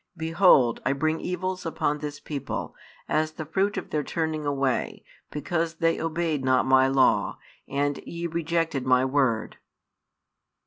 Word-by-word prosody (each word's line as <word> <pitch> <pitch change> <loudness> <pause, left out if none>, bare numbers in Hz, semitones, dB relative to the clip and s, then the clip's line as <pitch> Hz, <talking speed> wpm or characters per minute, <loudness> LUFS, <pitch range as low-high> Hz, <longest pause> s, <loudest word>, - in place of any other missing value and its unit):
Behold, 160 -7 +4
I 130 - +1
bring 155 +3 -1
evils 185 +1 -3
upon 150 -2 -1
this 145 -1 -6
people, 145 -2 -5 0.3
as 155 0 0
the 155 - -6
fruit 195 +6 0
of 190 - -5
their 150 - 0
turning 155 0 -2
away, 135 -2 -1 0.3
because 165 +2 -2
they 165 0 +1
obeyed 165 -3 -1
not 130 0 +3
My 130 0 +5
Law, 135 0 +2 0.3
and 145 +1 0
ye 170 0 -6
rejected 165 -4 -1
My 130 0 +3
word. 130 -5 0
155 Hz, 140 wpm, -26 LUFS, 135-165 Hz, 0.3 s, My